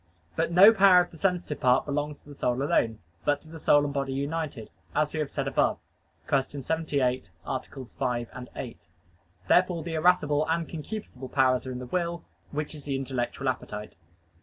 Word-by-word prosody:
But -, -, 0 dB
no 195 Hz, +6 st, +9 dB
power 195 Hz, -3 st, +7 dB
of 175 Hz, -, -4 dB
the 165 Hz, -, -12 dB
sensitive 180 Hz, -4 st, -1 dB
part 125 Hz, 0 st, +3 dB
belongs 145 Hz, +1 st, -2 dB
to -, -, -16 dB
the -, -, -9 dB
soul 125 Hz, -1 st, 0 dB
alone, 115 Hz, -5 st, +2 dB, 0.3 s
but 145 Hz, -1 st, +2 dB
to -, -, -18 dB
the 160 Hz, 0 st, -10 dB
soul 145 Hz, -1 st, +4 dB
and 140 Hz, -, -3 dB
body 135 Hz, -1 st, -1 dB
united, 140 Hz, -3 st, -3 dB, 0.2 s
as 150 Hz, 0 st, +1 dB
we 155 Hz, -, -2 dB
have 150 Hz, -2 st, -1 dB
said 140 Hz, -2 st, -3 dB
above 135 Hz, -, +2 dB, 0.5 s
(Q. 140 Hz, -, +3 dB, 0.2 s
78, 140 Hz, -, 0 dB, 0.2 s
AA. -, -, -1 dB
5, 125 Hz, -2 st, -4 dB
8). -, -, -8 dB, 0.6 s
Therefore 175 Hz, -, +3 dB
the 165 Hz, 0 st, -5 dB
irascible 155 Hz, -3 st, +3 dB
and 165 Hz, 0 st, 0 dB
concupiscible 155 Hz, -, -7 dB
powers 130 Hz, -1 st, +3 dB
are -, -, -3 dB
in 125 Hz, -, -4 dB
the 125 Hz, -, -6 dB
will, 170 Hz, +4 st, -2 dB, 0.3 s
which 150 Hz, +1 st, -3 dB
is 150 Hz, -3 st, -9 dB
the 140 Hz, -2 st, -1 dB
intellectual 135 Hz, 0 st, -3 dB
appetite. 105 Hz, -4 st, -4 dB
145 Hz, 185 wpm, -27 LUFS, 130-165 Hz, 0.6 s, no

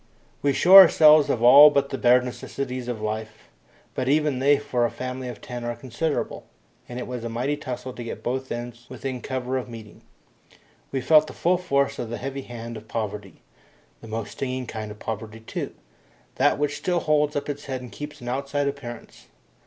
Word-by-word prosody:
We 140 Hz, -, +2 dB
shore 185 Hz, +7 st, +9 dB
ourselves 155 Hz, -4 st, +6 dB
of 115 Hz, -, 0 dB
all 140 Hz, +5 st, +10 dB
but 140 Hz, -1 st, 0 dB
the 135 Hz, -, -4 dB
bare 125 Hz, +1 st, +5 dB
necessaries 125 Hz, 0 st, -5 dB
of 120 Hz, -3 st, -4 dB
life, 110 Hz, 0 st, -5 dB, 0.4 s
but 130 Hz, 0 st, -2 dB
even 150 Hz, -2 st, +2 dB
they 140 Hz, +2 st, +4 dB
for 140 Hz, -4 st, -1 dB
a 120 Hz, -, +2 dB
family 130 Hz, +1 st, -6 dB
of 120 Hz, -4 st, -8 dB
ten 120 Hz, -1 st, -7 dB
are 120 Hz, 0 st, -3 dB
considerable, 130 Hz, +6 st, -3 dB, 0.4 s
and 120 Hz, -, -7 dB
it 125 Hz, -, -4 dB
was 125 Hz, -2 st, -6 dB
a 115 Hz, -, -4 dB
mighty 125 Hz, +6 st, -1 dB
tussle 130 Hz, -3 st, -6 dB
to 120 Hz, -, -7 dB
get 115 Hz, -, -7 dB
both 130 Hz, +2 st, -3 dB
ends 120 Hz, 0 st, -6 dB
within 130 Hz, 0 st, -5 dB
cover 130 Hz, 0 st, -2 dB
of 125 Hz, -, -8 dB
meeting. 110 Hz, -3 st, -11 dB, 0.9 s
We 135 Hz, -, -2 dB
felt 155 Hz, +2 st, +5 dB
the -, -, -9 dB
full 180 Hz, +1 st, +1 dB
force 140 Hz, -6 st, 0 dB
of 120 Hz, -, -4 dB
the 120 Hz, -, -4 dB
heavy 135 Hz, +1 st, -5 dB
hand 115 Hz, -2 st, -8 dB
of 110 Hz, 0 st, -12 dB
poverty 105 Hz, -3 st, -5 dB, 0.6 s
the -, -, -11 dB
most 110 Hz, 0 st, -5 dB
stinging 130 Hz, -1 st, -4 dB
kind 110 Hz, -2 st, -6 dB
of 105 Hz, -, -9 dB
poverty 110 Hz, +1 st, -6 dB
too, 115 Hz, -, -6 dB, 0.6 s
that 145 Hz, +2 st, +3 dB
which 145 Hz, 0 st, -1 dB
still 175 Hz, -2 st, -1 dB
holds 150 Hz, -1 st, +1 dB
up 145 Hz, -, -2 dB
its 145 Hz, -1 st, -5 dB
head 130 Hz, -2 st, -4 dB
and 125 Hz, -, -10 dB
keeps 150 Hz, -1 st, -8 dB
an 120 Hz, -, -9 dB
outside 140 Hz, +3 st, -1 dB
appearance. 130 Hz, -5 st, -8 dB
125 Hz, 200 wpm, -24 LUFS, 120-140 Hz, 0.9 s, all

